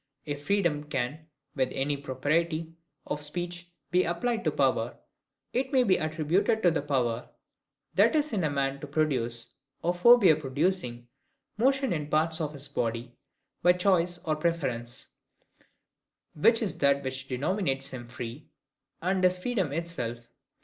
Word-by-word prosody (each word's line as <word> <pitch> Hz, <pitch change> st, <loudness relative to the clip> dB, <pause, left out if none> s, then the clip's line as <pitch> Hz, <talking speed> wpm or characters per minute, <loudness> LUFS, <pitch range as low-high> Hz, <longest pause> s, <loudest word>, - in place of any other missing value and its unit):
If 145 Hz, -1 st, -5 dB
freedom 170 Hz, -7 st, +1 dB
can 145 Hz, +2 st, -3 dB, 0.3 s
with 130 Hz, -2 st, +1 dB
any 145 Hz, +2 st, 0 dB
propriety 155 Hz, +4 st, -1 dB, 0.3 s
of 150 Hz, -, -3 dB
speech 175 Hz, +3 st, -5 dB, 0.2 s
be 180 Hz, +1 st, +4 dB
applied 230 Hz, +7 st, -1 dB
to -, -, +3 dB
power, -, -, +1 dB, 0.6 s
it 260 Hz, +2 st, 0 dB
may 260 Hz, -3 st, +5 dB
be 190 Hz, -6 st, +4 dB
attributed 165 Hz, +8 st, +1 dB
to 175 Hz, -, +6 dB
the 160 Hz, -, 0 dB
power 125 Hz, -5 st, -1 dB, 0.6 s
that -, -, +4 dB
is 300 Hz, -2 st, +1 dB
in 195 Hz, -5 st, +1 dB
a 155 Hz, -, +2 dB
man 140 Hz, -1 st, -1 dB
to 150 Hz, -, -7 dB
produce, 125 Hz, -6 st, -1 dB, 0.3 s
or 175 Hz, -, +2 dB
forbear 195 Hz, -2 st, +7 dB
producing, 140 Hz, -4 st, -1 dB, 0.5 s
motion 265 Hz, +1 st, +2 dB
in 150 Hz, -2 st, -3 dB
parts 160 Hz, +2 st, +1 dB
of 150 Hz, -1 st, -2 dB
his 140 Hz, -1 st, -6 dB
body, 120 Hz, -2 st, -3 dB, 0.5 s
by 180 Hz, +1 st, +6 dB
choice 180 Hz, -1 st, +2 dB
or 155 Hz, -1 st, +1 dB
preference; 140 Hz, -8 st, -2 dB, 1.3 s
which 225 Hz, +10 st, +4 dB
is 205 Hz, -, -3 dB
that 140 Hz, 0 st, +3 dB
which 130 Hz, 0 st, -4 dB
denominates 135 Hz, 0 st, -1 dB
him 120 Hz, -2 st, -7 dB
free, 120 Hz, +3 st, -7 dB, 0.5 s
and 185 Hz, +1 st, +1 dB
is 185 Hz, 0 st, +4 dB
freedom 190 Hz, -, -1 dB
itself. 125 Hz, -8 st, -4 dB
155 Hz, 145 wpm, -28 LUFS, 135-180 Hz, 1.3 s, forbear